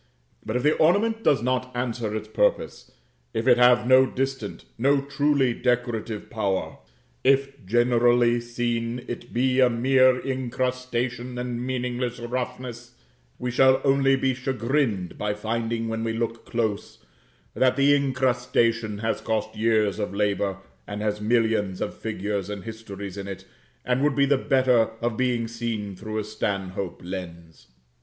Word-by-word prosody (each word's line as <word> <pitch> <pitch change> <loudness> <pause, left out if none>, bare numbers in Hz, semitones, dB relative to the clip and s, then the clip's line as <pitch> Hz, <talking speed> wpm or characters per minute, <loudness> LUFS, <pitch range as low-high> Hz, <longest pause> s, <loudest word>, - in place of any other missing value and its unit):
But 110 - -4
if 125 - 0
the 150 - +4
ornament 220 +8 +2
does 130 - +3
not 130 0 -1
answer 120 -3 -2
its 110 0 -4
purpose, 110 - 0 0.5
if 115 +3 -1
it 125 -1 +6
have 125 0 +5
no 130 +1 +6
distant, 135 -5 -4
no 140 +4 +3
truly 140 -2 +1
decorative 120 -3 -1
power; 100 -4 -2 0.4
if 135 -1 +2
generally 120 +1 +3
seen 120 0 -3
it 120 0 -7
be 130 +2 +1
a 130 -1 +6
mere 130 +2 +4
incrustation 125 -1 -2
and 125 -1 -3
meaningless 125 -1 -2
roughness, 120 0 -5 0.4
we 125 0 -3
shall 130 +2 +5
only 135 -1 +4
be 135 0 +1
chagrined 125 - -1
by 105 0 -1
finding 115 +1 -2
when 115 0 -3
we 115 0 -1
look 115 0 -3
close, 110 -3 -3 0.5
that 130 -1 +3
the 140 +1 +4
incrustation 125 -5 +1
has 115 - -1
cost 110 -1 -2
years 110 -2 +1
of 100 -1 -3
labor 100 -1 0 0.3
and 105 0 -5
has 105 0 -1
millions 110 -4 +1
of - - -3
figures 105 -2 -3
and 105 -2 -5
histories 100 -4 -8
in 100 0 -5
it 100 -2 -7 0.4
and 125 +1 +1
would 150 -2 +2
be 140 -1 +4
the 140 +1 +3
better 130 -4 +3
of 120 -1 -1
being 120 -1 0
seen 115 -4 -4
through 110 +3 -6
a 110 - -1
Stanhope 100 -3 -3
lens. 85 -3 -8
120 Hz, 150 wpm, -25 LUFS, 110-130 Hz, 0.5 s, it